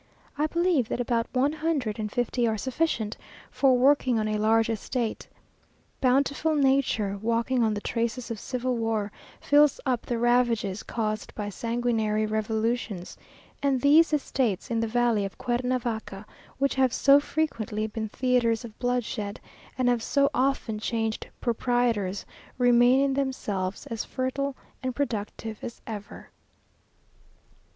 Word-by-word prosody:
I 300 +1 +1
believe 340 -7 +1
that - - -2
about 235 -1 0
one 265 +3 +2
hundred 295 -9 -1
and 210 -1 -3
fifty 245 0 0
are 220 -1 0
sufficient 250 -3 -1 0.3
for 265 -2 +4
working 260 -2 +4
on 215 -1 0
a 215 0 -1
large 225 +1 +3
estate. 230 +1 -3 0.7
Bountiful 280 +4 +2
nature, 265 -8 +2
walking 235 +3 +1
on 220 -2 +2
the 205 - -4
traces 235 +2 -2
of 225 - -4
civil 250 +1 -2
war, 225 -3 -1 0.3
fills 290 0 +4
up 250 -3 -1
the 240 - -1
ravages 235 -4 +2
caused 215 -2 -3
by 205 -1 -3
sanguinary 225 -1 0
revolutions, 220 -2 -2 0.5
and 275 -2 +2
these 305 +6 +5
estates 260 - -1
in 230 - +1
the 230 - 0
valley 235 -2 +2
of 195 - -5
Cuernavaca, 240 -5 -2 0.3
which 275 0 +1
have 260 -2 +3
so 280 +2 +6
frequently 230 -9 -2
been 220 0 -4
theatres 240 -1 +1
of 220 -2 -12
bloodshed, 240 -4 -2 0.4
and 255 -1 +1
have 245 -2 +2
so 280 +4 +2
often 255 -4 0
changed 225 0 -2
proprietors, 235 -5 0 0.3
remain 245 +1 +5
in 275 -1 +2
themselves 210 -8 -2
as 230 -6 -4
fertile 265 +2 -2 0.3
and 255 -2 -3
productive 220 -4 -3
as 235 - -6
ever. 210 -3 -8
240 Hz, 140 wpm, -27 LUFS, 220-260 Hz, 0.7 s, so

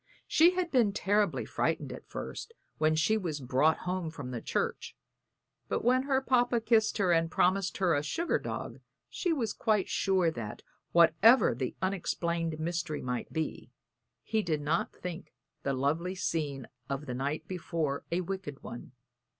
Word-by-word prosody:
She 345 +3 +5
had 360 -2 -1
been 235 -7 +3
terribly 205 -2 +1
frightened - - -1
at - - -11
first, 460 - -6 0.2
when 155 0 +3
she 160 +8 +3
was 165 -7 -3
brought 135 +5 +2
home 180 -2 -2
from 140 -5 -7
the 120 -2 -4
church; - - -2 0.7
but - - -1
when 255 +2 +4
her 265 -1 +3
papa 245 -2 +3
kissed 220 -1 +2
her 190 -4 +2
and 165 -1 +3
promised 190 +3 +1
her 185 -3 +3
a 145 - +2
sugar 330 - 0
dog - - -5 0.3
she 355 - -1
was 235 -9 0
quite 210 -4 +1
sure 185 -4 +2
that, 115 -8 -7 0.3
whatever 170 - +6
the 125 +2 -3
unexplained 170 -3 -1
mystery 165 -1 -2
might 125 -1 -3
be, 160 -1 -3 0.5
he 220 -1 0
did 155 -6 -1
not 155 +3 0
think 180 0 -7 0.3
the 140 - -1
lovely 160 +8 0
scene 145 -7 -2 0.2
of 140 +2 -3
the 125 - -4
night 145 +5 -3
before 165 -5 -2
a 175 +2 +1
wicked 180 -6 -5
one. 120 +1 -8
170 Hz, 160 wpm, -30 LUFS, 150-205 Hz, 0.7 s, whatever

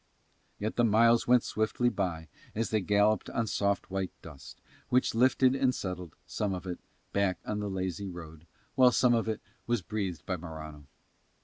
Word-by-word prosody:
Yet 110 +2 -3
the 120 - +4
miles 115 +1 +4
went 125 -1 +5
swiftly 110 +3 0
by 90 -7 -3 0.3
as 115 +1 -1
they 110 -1 +2
galloped 105 +2 +2
on 115 - -1
soft 100 -3 -1
white 95 -1 -1
dust, 70 -4 -11 0.3
which 125 +1 +2
lifted 130 +2 +4
and 135 -2 +2
settled, 90 -3 -5
some 95 +8 -2
of 90 - -7
it, 90 -1 -4 0.3
back 100 -2 +1
on 105 - -2
the 105 -1 -2
lazy 95 0 -3
road, 80 -2 -10 0.3
while 130 -2 +6
some 125 0 +4
of 115 -1 +1
it 110 - -2 0.3
was 120 -5 0
breathed 95 -2 -3
by 90 - -2
Morano. 80 -3 -9
100 Hz, 175 wpm, -30 LUFS, 90-115 Hz, 0.3 s, while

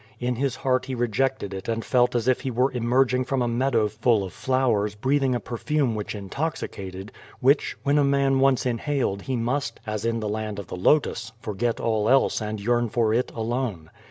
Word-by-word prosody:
In 125 0 0
his 135 -1 0
heart 130 -1 0
he 130 0 -4
rejected 120 -2 -1
it 95 -1 -6
and 115 0 -2
felt 125 -1 +2
as 120 0 0
if 130 - +2
he 135 - -2
were 130 +3 +1
emerging 125 +1 +2
from 135 -1 0
a - - 0
meadow 120 -2 +1
full 110 0 +1
of 95 - -7
flowers 120 -6 +1
breathing 130 +3 +1
a - - 0
perfume 130 +2 -1
which 105 0 -4
intoxicated, 100 - -5 0.3
which, 140 +3 +2
when 145 +1 +3
a - - +4
man 140 -1 +2
once 135 -2 +3
in 120 -2 0
haled 135 -9 -1
he 130 - -3
must, 120 +1 -2
as 110 -1 -3
in 115 0 0
the 110 - -3
land 105 0 -3
of 100 - -5
the - - -7
h)tus, 110 +2 +1
forget 115 +2 -2
all 110 -1 +1
else 135 -3 +3
and 105 0 -3
yearn 120 +2 +1
for 110 -1 +1
it 125 +3 0
alone. 115 -8 -3
120 Hz, 205 wpm, -25 LUFS, 110-130 Hz, 0.3 s, a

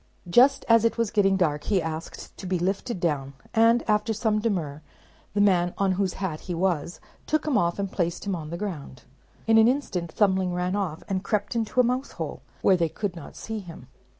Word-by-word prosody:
Just 265 +9 +5
as 230 -1 +5
it 230 - +1
was 230 -3 0
getting 195 -2 +3
dark 150 -5 0
he 200 -3 +2
asked 160 -1 -6
to 190 - -7
be 185 0 0
lifted 195 +5 -2
down; 145 -5 -1 0.2
and, 230 +1 +4
after 210 +1 +1
some 215 0 0
demur, 170 -10 -2 0.5
the 205 - +3
man 180 -3 +3
on 195 -1 +2
whose 185 0 0
hat 180 -6 -4
he 180 - -5
was, 175 -2 -1 0.3
took 310 0 0
him 300 -4 0
off 170 -4 +2
and 200 -1 -3
placed 175 +1 -2
him 200 -2 -1
on 155 -3 -6
the 170 - -4
ground. 150 - -6 0.4
In 225 0 +5
an 220 - +6
instant 195 - -1
Thumbling 190 -3 +1
ran 180 +2 -1
off, 185 -6 -3
and 190 -1 -2
crept 210 +2 -1
into 230 +2 -1
a - - +7
mousehole, 250 +3 -3 0.2
where 190 - +5
they 165 -2 +1
could 195 +1 -4
not 165 - -10
see 220 -1 -5
him. 165 -9 -11
190 Hz, 205 wpm, -26 LUFS, 170-220 Hz, 0.5 s, a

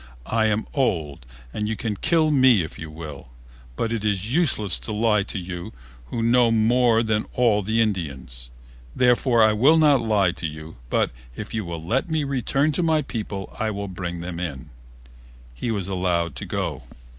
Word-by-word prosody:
I 110 - +1
am 110 0 0
old 80 - -1 0.3
and 105 0 -2
you 110 - -1
can 110 -1 -3
kill 155 - +2
me 130 - +5
if 80 - -8
you 80 - -7
will, 75 -4 -9 0.5
but 115 - -1
it 110 -2 -2
is 105 +2 -1
useless 120 - +2
to - - -5
lie 105 -1 +2
to 100 - -5
you 90 -1 -6 0.3
who 115 - -3
know 120 0 +4
more 115 +1 +3
than 110 -1 0
all 115 -4 +3
the 110 +3 +1
Indians. 70 - -3 0.5
Therefore 125 -1 +4
I 110 0 +5
will 135 +10 +5
not 150 -4 +5
lie 105 -5 +2
to 85 - -4
you 75 0 -9
but - - +1 0.2
if - - -7
you 110 -1 -1
will 85 -2 -6
let 130 - 0
me 160 -2 0
return 140 +2 0
to 150 - 0
my 160 -2 +2
people 105 -6 -5
I 110 - 0
will 100 -1 -4
bring 90 -2 -5
them 85 -1 -5
in." 70 -8 -5 0.8
He - - -4
was 100 -5 -2
allowed 90 -4 -1
to - - -6
go. - - -3
105 Hz, 185 wpm, -23 LUFS, 85-120 Hz, 0.8 s, me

